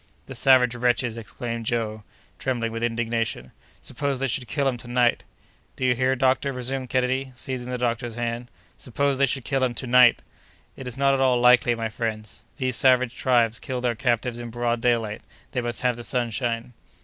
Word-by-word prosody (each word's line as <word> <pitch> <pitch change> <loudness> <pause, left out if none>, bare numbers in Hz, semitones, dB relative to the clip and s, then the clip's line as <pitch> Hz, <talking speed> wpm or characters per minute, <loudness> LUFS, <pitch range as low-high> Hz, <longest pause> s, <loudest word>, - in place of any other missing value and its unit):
"The 135 - -8
savage 125 -1 +4
wretches!" 120 -1 0
exclaimed 115 0 -5
Joe, 110 -2 -1 0.4
trembling 120 -3 -1
with 115 0 -5
indignation. 115 - -2 0.3
"Suppose 140 -2 -2
they 135 - 0
should 130 -1 -2
kill 140 +5 0
him 130 - +1
to 120 - -10
night!" 120 0 +2 0.5
"Do 130 - -2
you 125 - +4
hear, 130 +2 +1
doctor," 135 +2 +2
resumed 130 0 -3
Kennedy, 130 +1 0
seizing 130 -1 -5
the 125 - -2
doctor's 120 -1 -2
hand. 120 0 -3 0.3
"Suppose 140 +2 -1
they 140 - +4
should 130 -1 -3
kill 135 -2 0
him 125 -2 0
to 130 - -2
night!" 125 -1 +5 0.5
"It 130 - -8
is 125 +1 -5
not 140 0 +3
at 135 - +1
all 130 -2 +3
likely, 125 -1 +5
my 115 -1 -3
friends. 110 -1 -5
These 130 -3 -1
savage 130 -2 +3
tribes 120 -3 +2
kill 130 -2 -4
their 125 -1 0
captives 120 0 -1
in 120 -1 -6
broad 120 0 -1
daylight; 115 -3 0 0.3
they 125 -2 -1
must 120 0 -3
have 125 -2 +1
the 120 - -7
sunshine." 120 0 -1
125 Hz, 190 wpm, -24 LUFS, 115-130 Hz, 0.5 s, night